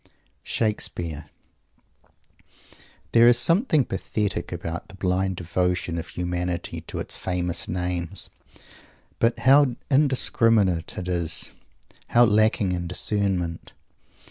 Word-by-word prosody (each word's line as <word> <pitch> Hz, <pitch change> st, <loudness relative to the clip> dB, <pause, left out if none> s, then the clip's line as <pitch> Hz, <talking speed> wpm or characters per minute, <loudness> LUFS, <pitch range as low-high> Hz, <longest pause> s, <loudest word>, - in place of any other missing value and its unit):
SHAKESPEARE 85 Hz, -8 st, -2 dB, 1.9 s
There 115 Hz, 0 st, +6 dB
is 120 Hz, 0 st, +6 dB
something 165 Hz, -, +3 dB
pathetic 100 Hz, -5 st, -3 dB
about 85 Hz, -1 st, -5 dB
the 95 Hz, -, -13 dB
blind 95 Hz, 0 st, 0 dB
devotion 90 Hz, 0 st, -1 dB
of 80 Hz, -, -7 dB
humanity 90 Hz, 0 st, -3 dB
to -, -, -6 dB
its -, -, -3 dB
famous 90 Hz, -2 st, -2 dB
names. 90 Hz, -1 st, -2 dB, 0.9 s
But 115 Hz, +1 st, +2 dB
how 135 Hz, -1 st, +5 dB, 0.2 s
indiscriminate 115 Hz, -, +2 dB
it 90 Hz, -, -4 dB
is; 85 Hz, -3 st, 0 dB, 0.6 s
how 120 Hz, 0 st, +5 dB
lacking 110 Hz, -2 st, +2 dB
in 90 Hz, -1 st, -3 dB
discernment! 90 Hz, -2 st, -1 dB
90 Hz, 100 wpm, -24 LUFS, 85-115 Hz, 1.9 s, There